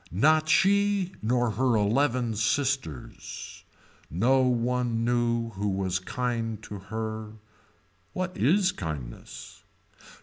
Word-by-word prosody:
Not 155 - +3
she 200 0 +3
nor 120 +1 +1
her 125 +3 +2
eleven 115 +2 +2
sisters. 115 - -2 0.5
No 120 - +3
one 120 -2 +1
knew 120 -1 +1
who 105 0 -2
was 95 -1 -1
kind 115 +1 -2
to 105 -2 -7
her. 110 -1 -4 0.8
What 185 0 -3
is 185 +6 +3
kindness. 75 - -7
120 Hz, 100 wpm, -27 LUFS, 105-135 Hz, 0.8 s, Not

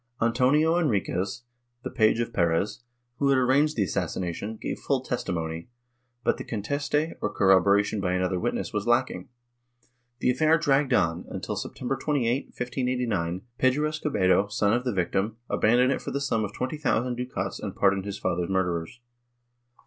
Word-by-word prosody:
Antonio 135 +8 +3
Enriquez, 105 - -1 0.4
the 130 - -4
page 110 0 +3
of 115 0 -2
Perez, 85 +5 0 0.4
who 140 - +2
had 135 - +4
arranged 135 +4 +3
the 105 - +2
assassination, 95 +4 -3
gave - - -4
full - - 0
testimony, 80 +1 -3 0.5
but - - +2
the - - -6
conteste, 145 +8 -1
or - - -1
corroboration 100 +2 +3
by 90 -1 0
another 90 0 0
witness - - -2
was 105 +1 -2
lacking. 120 -6 +1 0.9
The 125 - +2
affair 155 +5 +3
dragged 145 -3 +2
on, 85 -7 +1
until, - - -4
September 130 +2 -3
28, 135 -2 0
1589, 125 -8 -2 0.2
Pedro 130 +4 +3
Escobedo, 135 -11 +1
son 105 0 +1
of 125 +2 0
the 125 - +1
victim, 95 +3 -1
abandoned 125 +4 +3
it 140 - -1
for - - -5
the 140 - -2
sum 115 -6 0
of 100 - -3
twenty 130 +7 -3
thousand 125 -4 0
ducats 125 +1 -4
and - - -5
pardoned 100 -1 +2
his 100 -1 -4
father's 90 -1 -1
murderers. 90 +3 -1
115 Hz, 155 wpm, -26 LUFS, 95-130 Hz, 0.9 s, had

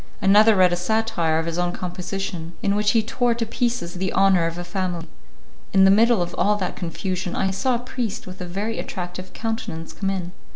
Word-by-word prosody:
Another 210 +3 +6
read 185 -2 +5
a - - +2
satire 180 -4 0
of 160 - -1
his 170 +1 -2
own 175 0 0
composition, 180 -1 -5
in 200 - +2
which 210 0 +2
he 225 -2 +3
tore 240 +1 +1
to 230 -1 -1
pieces 235 -5 -1
the 185 +1 -2
honour 190 -3 +4
of 165 +1 -5
a 175 - -4
family. 175 -2 -3 0.7
In 190 -1 +6
the 195 - +7
middle 225 -1 +4
of 175 - -6
all 210 +1 +3
that 190 -3 -3
confusion, 180 +1 -3
I 190 - +1
saw 250 +6 +1
a 240 +1 -4
priest 245 -5 -3
with 185 0 -9
a - - -3
very 205 +6 -3
attractive 180 0 -6
countenance 225 -8 -4
come 195 - -2
in. 185 -2 -3
190 Hz, 210 wpm, -23 LUFS, 175-220 Hz, 0.7 s, the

